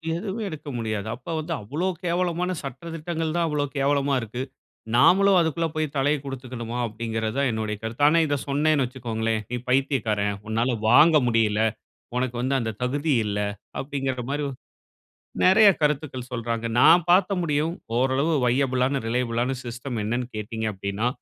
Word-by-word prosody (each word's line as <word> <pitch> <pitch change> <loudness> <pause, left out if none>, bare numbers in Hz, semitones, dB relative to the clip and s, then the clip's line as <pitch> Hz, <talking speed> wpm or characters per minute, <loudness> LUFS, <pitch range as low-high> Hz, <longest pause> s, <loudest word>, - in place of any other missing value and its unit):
எதுமே 195 +5 -4
எடுக்க 155 -2 -9
முடியாது. 110 -2 -3
அப்ப 125 +7 -7
வந்து, 165 +2 -3
அவ்ளோ 150 - -2 0.2
கேவலமான 175 +1 0
சட்ட 135 +5 -7
திட்டங்கள் 165 0 -3
தான் 170 -1 +2
அவ்ளோ 150 -1 0
கேவலமா 140 0 +2
இருக்கு. 115 +3 -5 0.5
நாமளும் 195 +9 +5
அதுக்குள்ள 165 0 +1
போய் 155 0 +1
தலைய 145 +2 +2
குடுத்துக்கணுமா? 125 -3 -6
அப்டிங்கிறதா 110 +2 -3
என்னுடைய 110 -1 -2
கருத்து. 115 +6 -3
ஆனா, 165 +3 +5
இத 145 - +1
சொன்னேன்னு 145 0 +2
வச்சுக்கோங்களேன், 115 -3 -2
நீ 125 - -1
பைத்தியக்காரன், 110 -6 +1
உன்னால 115 +3 0 0.2
வாங்க 155 +6 +7
முடியல, 110 -2 +2 0.6
உனக்கு 125 -1 -1
வந்து 130 +2 0
அந்த 115 -1 -2
தகுதி 145 +4 0
இல்ல, 105 -1 -2 0.4
அப்டிங்கிற 135 -3 -3
மாரி 145 +1 -1 1.0
நெறைய 205 +3 +7
கருத்துக்கள் 140 -4 -1
சொல்றாங்க. 115 -1 -3
நான் 165 +4 +7
பாத்த 185 +2 +5
முடியும் 155 0 0 0.2
ஓரளவு 135 +5 +2
வையபிளான, 130 +1 +1
ரிலையபிளான 120 +1 0
சிஸ்டம் 120 0 -5
என்னன்னு 120 +4 -1
கேட்டீங்க 110 +1 -4
அப்டின்னா. 100 +4 -2
130 Hz, 140 wpm, -25 LUFS, 115-155 Hz, 1.0 s, வாங்க